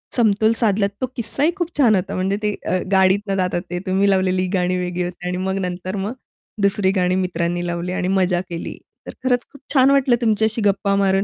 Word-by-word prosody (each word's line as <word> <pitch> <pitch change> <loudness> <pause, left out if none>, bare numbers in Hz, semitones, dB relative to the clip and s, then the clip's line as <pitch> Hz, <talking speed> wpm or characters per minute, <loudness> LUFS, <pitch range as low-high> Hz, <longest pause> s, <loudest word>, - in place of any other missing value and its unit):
समतोल 220 -1 +3
साधलात 205 -3 +2
तो - - +2
किस्साही 250 +7 0
खूप 345 -4 -2
छान 235 -7 +5
होता 185 - -2
म्हणजे 190 +2 0
ते 210 -1 +1
अ, 185 - +1
गाडीतून 195 +1 +3
जातात 180 -1 0
ते 175 0 -3
तुम्ही 195 +2 +2
लावलेली 185 -1 +2
गाणी 180 0 +1
वेगळी 180 0 -2
होती 175 0 -6
आणि 180 0 -2
मग 190 0 -1
नंतर 180 +2 -5
मग 200 +4 -3 0.5
दुसरी 200 -1 +2
गाणी 180 0 +2
मित्रांनी 175 0 -2
लावली 175 +1 -3
आणि 180 - -1
मजा 185 -2 +1
केली. 170 -1 -6 0.3
तर - - -6
खरंच 245 -2 +1
खूप 280 - -16
छान 265 0 +5
वाटलं 270 -3 +4
तुमच्याशी 220 0 +1
गप्पा 200 0 +2
मारून. 195 0 +2
195 Hz, 200 wpm, -20 LUFS, 180-220 Hz, 0.5 s, छान